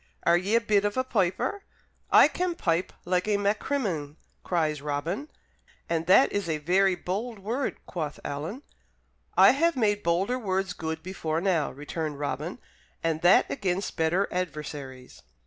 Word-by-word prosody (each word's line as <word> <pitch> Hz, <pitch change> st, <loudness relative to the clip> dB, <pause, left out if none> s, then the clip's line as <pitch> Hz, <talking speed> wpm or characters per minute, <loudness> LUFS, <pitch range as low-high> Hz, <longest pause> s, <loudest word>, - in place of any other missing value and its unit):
Are 170 Hz, -, +5 dB
ye 190 Hz, +5 st, +1 dB
a 230 Hz, -, +4 dB
bit 210 Hz, -3 st, +2 dB
of 205 Hz, +3 st, -1 dB
a 255 Hz, -, +2 dB
piper?" 235 Hz, -, 0 dB, 0.5 s
"I -, -, +8 dB
can 360 Hz, -1 st, -2 dB
pipe 170 Hz, -, 0 dB
like 180 Hz, +2 st, 0 dB
a 210 Hz, -1 st, +2 dB
Maccrimmon!" 200 Hz, -, -1 dB, 0.3 s
cries 155 Hz, -4 st, 0 dB
Robin. 155 Hz, -, -3 dB, 0.6 s
"And 165 Hz, 0 st, -1 dB
that 190 Hz, +9 st, +6 dB
is 200 Hz, -4 st, -2 dB
a 155 Hz, -, 0 dB
very 185 Hz, +5 st, +2 dB
bold 210 Hz, +7 st, -4 dB
word," 230 Hz, +8 st, -2 dB
quoth 155 Hz, -5 st, -5 dB
Alan. 155 Hz, -, -5 dB, 0.7 s
"I -, -, +9 dB
have 335 Hz, +4 st, +2 dB
made 205 Hz, -4 st, +1 dB
bolder 190 Hz, +9 st, +1 dB
words 190 Hz, -4 st, -1 dB
good 160 Hz, -1 st, -5 dB
before 165 Hz, -4 st, -2 dB
now," 170 Hz, -5 st, +1 dB
returned 150 Hz, +2 st, -5 dB
Robin, 145 Hz, 0 st, -3 dB, 0.5 s
"and 160 Hz, -1 st, 0 dB
that 175 Hz, +1 st, +6 dB
against 190 Hz, +1 st, -2 dB
better 170 Hz, +5 st, +1 dB
adversaries." 145 Hz, -7 st, -5 dB
180 Hz, 150 wpm, -27 LUFS, 160-205 Hz, 0.7 s, I